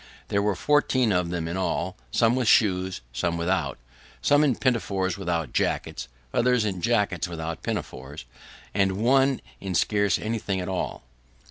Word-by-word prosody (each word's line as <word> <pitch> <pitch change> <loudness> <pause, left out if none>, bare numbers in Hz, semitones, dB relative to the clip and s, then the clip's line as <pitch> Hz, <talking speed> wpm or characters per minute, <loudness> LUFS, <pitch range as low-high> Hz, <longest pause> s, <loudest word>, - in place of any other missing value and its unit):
There 100 - +2
were 105 -1 +1
fourteen 130 -1 +2
of 90 -2 +1
them 85 -2 -2
in 85 +3 -3
all, 90 0 -1
some 115 0 +3
with 130 -3 0
shoes, 95 - +3
some 85 +6 -1
without; 85 -5 -1 0.4
some 145 +1 +4
in 135 -5 +3
pinafores 100 -8 0
without 85 -5 -2
jackets, - - -1 0.3
others 125 -2 +3
in 95 -4 -2
jackets 105 -7 +1
without 80 -1 -5
pinafores, 75 - -5 0.5
and 95 -1 +2
one 130 +6 +3 0.2
in 95 -2 -4
scarce 100 0 +2
anything 110 -3 -2
at 90 - -4
all. 95 -8 -3
95 Hz, 150 wpm, -26 LUFS, 85-115 Hz, 0.5 s, some